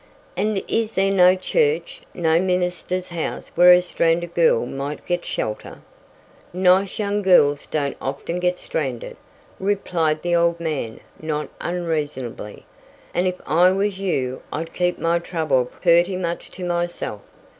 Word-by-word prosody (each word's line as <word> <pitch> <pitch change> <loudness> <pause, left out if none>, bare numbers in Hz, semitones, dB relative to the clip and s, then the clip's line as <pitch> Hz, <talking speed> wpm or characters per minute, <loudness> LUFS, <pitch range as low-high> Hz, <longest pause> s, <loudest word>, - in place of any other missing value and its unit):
"And 210 -2 0
is 225 -1 -1
there 195 +1 +2
no 185 -1 +6
church 470 - 0
no 160 -1 +2
minister's 180 0 -1
house 170 -3 -4
where 180 +1 +7
a 180 0 +6
stranded 170 0 0
girl 165 -9 +3
might 140 +3 -5
get 175 -1 -1
shelter?" 105 0 -4 0.7
"Nice 185 +1 +3
young 205 -1 -1
girls 145 -7 +4
don't 145 -2 -2
often 140 +6 -3
get 180 0 0
stranded," 135 -10 -4 0.4
replied 175 -6 0
the 175 0 +1
old 170 0 +2
man 150 -9 -4 0.2
not 150 -1 -3
unreasonably, 150 -11 -4 0.5
"and 180 +1 +1
if 180 - -1
I 170 +5 +5
was 195 0 -1
you 130 -10 -2
I'd 165 +2 -5
keep 180 0 0
my 170 +1 +1
trouble 155 -7 0
purty 175 +6 +2
much 170 -2 -4
to 185 - -6
myself. 175 -11 -3
175 Hz, 140 wpm, -22 LUFS, 155-185 Hz, 0.7 s, where